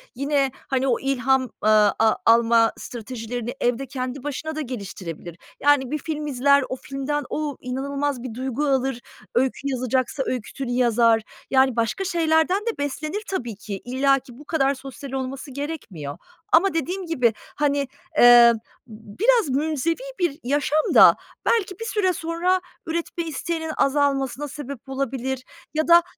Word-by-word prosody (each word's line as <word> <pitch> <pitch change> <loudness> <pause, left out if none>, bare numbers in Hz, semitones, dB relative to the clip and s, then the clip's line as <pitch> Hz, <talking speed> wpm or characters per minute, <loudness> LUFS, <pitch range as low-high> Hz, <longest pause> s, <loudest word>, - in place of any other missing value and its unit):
yine, 275 0 +1 0.2
hani, 265 0 0
o 240 - +2
ilham, 265 -1 +2
eee, 215 -3 -2 0.3
a 220 -1 +4
alma 230 0 +5
stratejilerini 240 0 -5
evde 245 +2 +1
kendi 255 0 -5
başına 305 +2 -4
da 310 - -2
geliştirebilir. 185 - -7 0.2
Yani, 280 -3 +3
bir 305 - 0
film 300 0 -4
izler, 280 +1 +3
o - - -2
filmden 275 +3 -3
o 300 -3 -3
inanılmaz 275 +1 -2
bir 255 -3 -6
duygu 260 +4 -2
alır. 265 -2 +1 0.4
Öykü 260 +2 +1
yazacaksa 260 0 -1
öyküsünü 255 +1 -4
yazar. 235 -2 +3 0.3
Yani, 265 -2 +4
başka 230 - 0
şeylerden 340 +2 +2
de 465 - -2
beslenir 305 +7 -3
tabii 240 - -3
ki. 200 -1 -7
İllaki 265 0 +1
bu 295 - -12
kadar 275 -3 +1
sosyal 270 0 -9
olması 270 +1 -4
gerekmiyor. 235 - -6 0.3
Ama 370 +4 +5
dediğim 355 +4 -2
gibi, 250 -9 +2 0.2
hani, 285 -2 +1 0.3
eee, 240 -1 +9 0.3
b 215 -2 -13
biraz 460 - +4
münzevi 305 +3 0 0.2
bir 340 -5 0
yaşam 290 +3 +1
da - - +9 0.3
belki 385 -5 +1
bir 455 - -4
süre 410 -5 +1
sonra 345 +3 0 0.2
üretme 335 +1 -3
isteğinin 320 +1 -3
azalmasına 275 0 +1
sebep 280 -2 -8
olabilir 265 -1 -3 0.3
ya 315 +1 0
da 340 0 +7
270 Hz, 145 wpm, -23 LUFS, 245-305 Hz, 0.4 s, eee